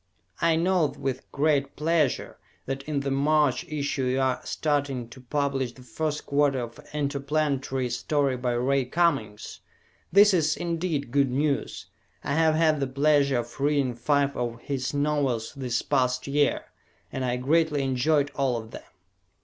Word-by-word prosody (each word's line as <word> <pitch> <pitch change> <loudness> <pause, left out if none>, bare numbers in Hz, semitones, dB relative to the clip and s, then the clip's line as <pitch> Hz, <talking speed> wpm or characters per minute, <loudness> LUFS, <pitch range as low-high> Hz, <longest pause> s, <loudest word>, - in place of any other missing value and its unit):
I 165 -1 +3
note 170 -3 +1
with 135 -1 -4
great 140 -1 +1
pleasure 155 -3 0 0.3
that 135 0 -3
in 150 -2 -1
the 140 0 -2
March 145 0 +2
issue 145 -3 -2
you 130 +1 0
are 130 -1 +1
starting 140 -5 -1
to 130 +2 -13
publish 135 -1 -1
the 125 - -15
first 150 +6 -3
quarter 140 -1 +2
of 115 -1 -8
an - - -15
interplanetary 140 -2 -1
story 140 +1 0
by 125 -1 -1
Ray 130 +2 +1
Cummings. 135 -9 -1 0.5
This 205 +1 +6
is, 155 -3 +2
indeed, 165 -6 -2
good 140 0 +3
news. 140 +2 -1 0.4
I 140 - -2
have 160 0 +3
had 155 -2 +3
the 135 - 0
pleasure 140 0 +2
of 120 +3 -5
reading 140 -3 +1
five 140 +3 +1
of 120 -1 -3
his 130 -2 -3
novels 145 -6 0
this 125 -4 -2
past 125 -2 0
year 145 +1 +1 0.5
and 130 - -3
I 125 -1 0
greatly 150 +2 +1
enjoyed 140 +3 +1
all 135 -3 0
of 110 0 -8
them. - - -8
140 Hz, 155 wpm, -26 LUFS, 130-150 Hz, 0.5 s, This